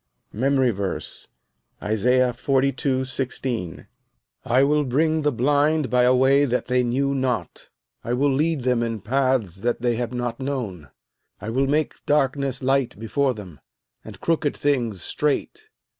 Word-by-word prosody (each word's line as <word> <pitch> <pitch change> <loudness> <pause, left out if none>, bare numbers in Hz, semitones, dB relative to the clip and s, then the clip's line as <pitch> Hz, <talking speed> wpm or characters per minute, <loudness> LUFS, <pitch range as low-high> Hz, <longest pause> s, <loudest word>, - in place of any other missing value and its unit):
MEMORY 130 +1 +2
VERSE, 100 -2 -5 0.5
Isaiah 125 +4 +2
42: 135 +1 0
16 130 -8 -4 0.6
"I 130 +3 +3
will 150 +1 +3
bring 155 +4 +1
the 150 0 +1
blind 145 +2 +1
by 125 0 +4
a 125 +1 +5
way 135 +2 +4
that 125 -3 0
they 125 0 +2
knew 135 +3 0
not; 125 - -3 0.3
I 120 - -2
will 135 +2 +2
lead 150 0 0
them 125 -2 +1
in 115 -3 -3
paths 130 -6 0
that 120 +3 -2
they 120 -2 +1
have 120 -1 -2
not 120 -1 -3
known: 115 - -4 0.5
I 110 - -5
will 135 +3 +1
make 150 +2 -1
darkness 135 -2 +1
light 135 -5 +1
before 130 +4 0
them, 90 -8 -10 0.4
and - - -11
crooked 160 -3 0
things 120 -10 0
straight. 415 - -2
130 Hz, 145 wpm, -23 LUFS, 120-140 Hz, 0.6 s, a